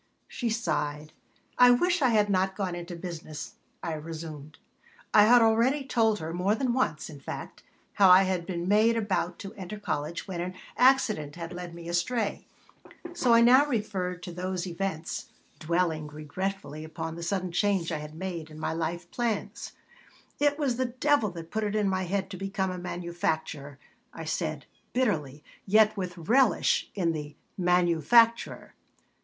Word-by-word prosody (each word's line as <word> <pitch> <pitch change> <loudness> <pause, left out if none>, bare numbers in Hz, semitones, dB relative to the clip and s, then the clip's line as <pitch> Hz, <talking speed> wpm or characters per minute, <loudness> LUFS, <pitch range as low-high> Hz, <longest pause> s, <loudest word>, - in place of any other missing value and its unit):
She 240 - -3
sighed 155 -8 -2 0.5
"I 250 0 +9
wish 350 +8 +3
I 260 - +4
had 210 -3 +3
not 190 -1 +1
gone 190 -3 -2
into 175 0 -6
business," 165 -3 -7 0.3
I 165 - -2
resumed 155 -1 -7 0.6
I 210 - +8
had 240 +1 +7
already 235 +6 +3
told 225 -5 +2
her, 160 -3 -5
more 185 +4 +1
than 250 +1 0
once, 245 -12 0
in 145 -3 -10
fact, - - -7 0.3
how 195 -2 +6
I 185 +1 +8
had 185 -2 -1
been 175 0 -2 0.3
about 190 -5 -1
to 200 +1 -8
enter 195 0 -7
college 165 -2 -3
when 180 -3 -4
an 180 +1 -4 0.2
accident 220 - +3
had 170 0 -6
led 175 -1 -7
me 170 0 -9
astray; 200 +6 -1 0.7
so 255 -9 +3
I 230 - +6
now 255 +5 +6
referred 190 -8 -2
to 180 - -6
those 180 +1 -3
events, 170 -2 -4 0.3
dwelling 160 -2 0
regretfully 155 +1 -5
upon 160 0 -5
the 170 - -8
sudden 185 +1 -2
change 190 -2 +1
I 155 - -2
had 150 +1 -9
made 170 -3 -5
in 155 0 -11
my 155 - -2
life 170 +2 -3
plans 235 -1 -3 0.7
"It 290 0 +2
was 270 -6 0
the 260 - +1
devil 255 -1 +1
that 170 -2 -9
put 220 0 -1
it 210 0 -1
in 210 -2 +2
my 185 -1 0
head 190 +1 -2
to 185 - -6
become 195 -1 -2
a 180 - -5
manufacturer," 170 -5 -3 0.4
I 165 - -6
said, 155 -2 -3 0.3
bitterly, 155 - -1 0.2
yet 215 +2 +5
with 180 -3 -4
relish 235 +9 +2
in 175 -4 +1
the 150 -2 -6 0.2
"manufacturer." 180 +6 +3
185 Hz, 165 wpm, -28 LUFS, 165-215 Hz, 0.7 s, I